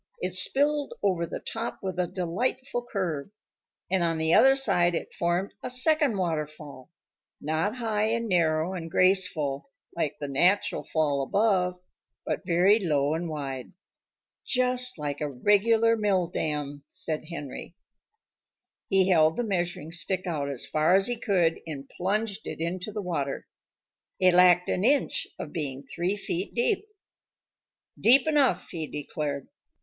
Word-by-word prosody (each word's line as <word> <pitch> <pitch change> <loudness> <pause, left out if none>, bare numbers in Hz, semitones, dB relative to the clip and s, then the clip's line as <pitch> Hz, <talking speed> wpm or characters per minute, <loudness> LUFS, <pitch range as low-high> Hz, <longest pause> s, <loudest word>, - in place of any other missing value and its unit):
It 180 0 -3
spilled 285 +10 +2
over 180 -4 +1
the - - -5
top 225 +1 -5
with 185 -2 -4
a 180 - +1
delightful 240 +8 -2
curve. 170 -8 -2 0.6
And 190 -2 +2
on 165 -1 0
the 160 +1 +2
other 270 0 +6
side 175 -10 +3
it - - -5
formed 175 +3 -1
a - - -5
second 275 -1 +3
waterfall 150 -6 -4 0.5
not 160 +9 -1
high 220 -4 -1
and 230 +1 -1
narrow 165 -2 +1
and 165 -3 -6
graceful 180 - +1 0.3
like 150 -3 -2
the 145 - -4
natural 175 +9 +2
fall 150 -3 0
above, 180 +2 +1 0.5
but - - -3
very 185 +5 +4
low 150 -6 +1
and 165 +1 -3
wide. 135 -5 -5 0.7
"Just 250 -2 +2
like 145 -1 -4
a 150 - -1
regular 220 - +3
mill 200 -5 +1
dam," 150 -4 -3
said 155 -1 -3
Henry. 155 0 -8 1.1
He 190 -1 +4
held 160 -3 +4
the 245 - 0
measuring 175 -6 -2
stick 185 +2 -1
out 150 -5 -2
as 135 -4 -4
far 155 +4 +2
as 195 0 +3
he 245 - 0
could 175 -7 +1
and 140 -3 -6
plunged 205 +5 -2
it - - -6
into 180 +5 -3
the 210 0 -5
water. 145 -6 -3 0.7
It 185 -1 +5
lacked 180 0 +6
an 185 - -1
inch 275 +4 +1
of 150 - -7
being 140 -4 -4
three 175 +7 -2
feet 190 -2 -3
deep. 400 - +1 1.1
"Deep 260 +4 +6
enough," 275 - +2
he 160 -3 -3
declared. 145 -1 -4
180 Hz, 145 wpm, -27 LUFS, 155-210 Hz, 1.1 s, other